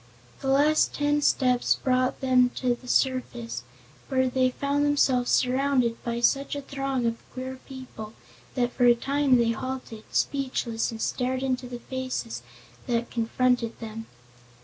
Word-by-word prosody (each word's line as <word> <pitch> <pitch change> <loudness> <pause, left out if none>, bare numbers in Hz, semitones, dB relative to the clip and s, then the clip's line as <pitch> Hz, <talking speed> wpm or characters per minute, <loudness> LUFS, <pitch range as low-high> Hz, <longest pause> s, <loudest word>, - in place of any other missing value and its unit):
The 270 - -5
last 290 +3 +3
ten 290 0 +1
steps 250 -3 +3
brought 255 -1 0
them 255 -1 +4
to 250 -2 +1
the 250 +1 -11
surface, 120 - 0 0.5
where 260 -1 +2
they 255 0 +2
found 280 +3 0
themselves 270 -4 +2
surrounded 255 -2 +2
by 235 0 -2
such 275 +4 +2
a 285 - -3
throng 270 -2 -2
of 230 0 -1
queer 260 0 -6
people 255 -5 -9 0.4
that 245 -1 0
for 245 - +2
a 240 -1 +7
time 275 +1 +2
they 235 -1 +3
halted, 235 -2 -5
speechless, 255 -5 -1
and 225 - -6
stared 255 +3 -1
into 255 -1 -1
the 245 0 -6
faces 255 - -4 0.5
that 240 -1 -1
confronted 235 0 0
them. 225 0 -7
255 Hz, 150 wpm, -26 LUFS, 235-270 Hz, 0.5 s, a